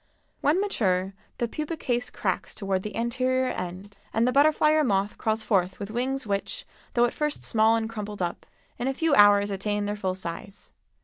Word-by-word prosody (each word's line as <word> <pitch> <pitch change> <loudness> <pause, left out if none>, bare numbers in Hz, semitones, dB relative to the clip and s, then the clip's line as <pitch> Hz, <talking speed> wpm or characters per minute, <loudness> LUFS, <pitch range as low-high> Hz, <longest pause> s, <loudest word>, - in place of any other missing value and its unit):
When 300 +6 +2
mature 195 - 0 0.2
the 235 - 0
pupa 305 +6 -4
case 245 -3 -1
cracks - - -3
toward 195 -3 -1
the 210 - -6
anterior 255 +2 0
end, 185 +3 -6
and 225 +2 +2
the - - +3
butterfly 300 +2 +4
or 310 0 +4
moth 200 -4 +1
crawls 220 0 0
forth 185 -4 +1
with 200 +1 -5
wings 260 +3 -1
which, 205 - -3 0.3
though 240 0 +5
at 240 - -2
first 300 -1 -2
small 220 0 +3
and 225 -1 -1
crumpled 210 -2 -6
up, 175 -2 -3 0.3
in 245 - -1
a 270 - -1
few 325 0 +1
hours 205 -2 +6
attain 205 +1 -1
their 205 0 -2
full 190 -3 -2
size. 185 +2 -8
220 Hz, 190 wpm, -26 LUFS, 200-260 Hz, 0.3 s, hours